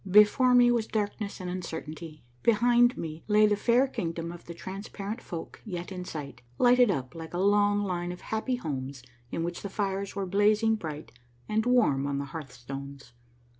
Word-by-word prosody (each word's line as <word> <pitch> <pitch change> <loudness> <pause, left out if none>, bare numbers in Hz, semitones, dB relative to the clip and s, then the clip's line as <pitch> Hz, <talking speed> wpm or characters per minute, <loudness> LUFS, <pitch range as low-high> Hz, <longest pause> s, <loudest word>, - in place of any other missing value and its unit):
Before 210 +6 +6
me 245 -1 +7
was 230 -2 +1
darkness 210 -1 -3
and 185 - -5
uncertainty; 160 -4 -6 0.2
behind 240 +2 +4
me 160 -1 -6
lay 210 0 +5
tlie 210 - +3
fair 240 +5 +3
Kingdom 165 -7 -4
of 175 0 -11
the 170 - -6
Transparent 200 +4 -6
Folk 165 -2 -7
yet 180 -4 -5
in 180 -1 -5
sight, 150 -5 -7 0.2
lighted 245 -1 +5
up 130 -8 -2
like 165 0 -8
a - - -1
long 205 +1 +3
line 175 -2 -2
of 180 - -8
happy 220 +4 -1
homes 135 - -5 0.3
in 165 - -2
which 175 +1 -4
the 200 - -5
fires 195 0 -2
were 200 -1 -1
blazing 210 +4 +3
bright 160 -7 -5 0.4
and 220 +2 0
warm 180 - +3
on 140 -1 -1
the 140 - -2
hearthstones. 135 -2 -8
190 Hz, 175 wpm, -28 LUFS, 160-215 Hz, 0.4 s, me